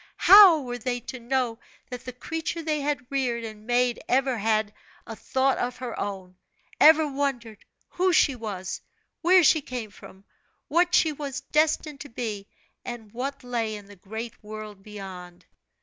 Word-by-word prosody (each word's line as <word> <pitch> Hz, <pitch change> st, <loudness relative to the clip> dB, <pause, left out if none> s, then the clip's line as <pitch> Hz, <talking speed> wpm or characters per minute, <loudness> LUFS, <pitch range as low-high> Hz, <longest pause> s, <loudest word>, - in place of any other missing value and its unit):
How 385 Hz, -4 st, +9 dB
were 245 Hz, -2 st, -5 dB
they 245 Hz, +1 st, -2 dB
to 255 Hz, +2 st, -8 dB
know 240 Hz, -1 st, -1 dB, 0.3 s
that 250 Hz, -1 st, -7 dB
the 255 Hz, -, -5 dB
creature 325 Hz, +6 st, -4 dB
they 305 Hz, -2 st, -1 dB
had 280 Hz, -3 st, -2 dB
reared 250 Hz, -4 st, -1 dB
and 215 Hz, -1 st, -9 dB
made 245 Hz, 0 st, +1 dB
ever 260 Hz, 0 st, +2 dB
had 215 Hz, 0 st, 0 dB, 0.3 s
a 225 Hz, -, -7 dB
thought 265 Hz, +3 st, 0 dB
of 250 Hz, +1 st, -2 dB
her 250 Hz, -2 st, -6 dB
own 190 Hz, -2 st, -5 dB, 0.4 s
ever 315 Hz, 0 st, +7 dB
wondered 270 Hz, -6 st, -3 dB, 0.3 s
who 370 Hz, +1 st, +1 dB
she 295 Hz, -4 st, +4 dB
was, 200 Hz, -5 st, -5 dB, 0.4 s
where 360 Hz, +1 st, +6 dB
she 315 Hz, 0 st, +5 dB
came 245 Hz, -6 st, -6 dB
from, 190 Hz, 0 st, -15 dB, 0.4 s
what 350 Hz, +3 st, +3 dB
she 320 Hz, -, +4 dB
was 285 Hz, -2 st, -5 dB
destined 305 Hz, -1 st, 0 dB
to 290 Hz, -, -9 dB
be, 215 Hz, -4 st, -5 dB, 0.4 s
and 230 Hz, -4 st, -8 dB
what 270 Hz, +4 st, -5 dB
lay 230 Hz, -3 st, -2 dB
in 205 Hz, -1 st, -10 dB
the 205 Hz, 0 st, -14 dB
great 220 Hz, +5 st, -8 dB
world 215 Hz, -1 st, -9 dB
beyond? 190 Hz, -4 st, -10 dB
245 Hz, 165 wpm, -26 LUFS, 215-280 Hz, 0.4 s, How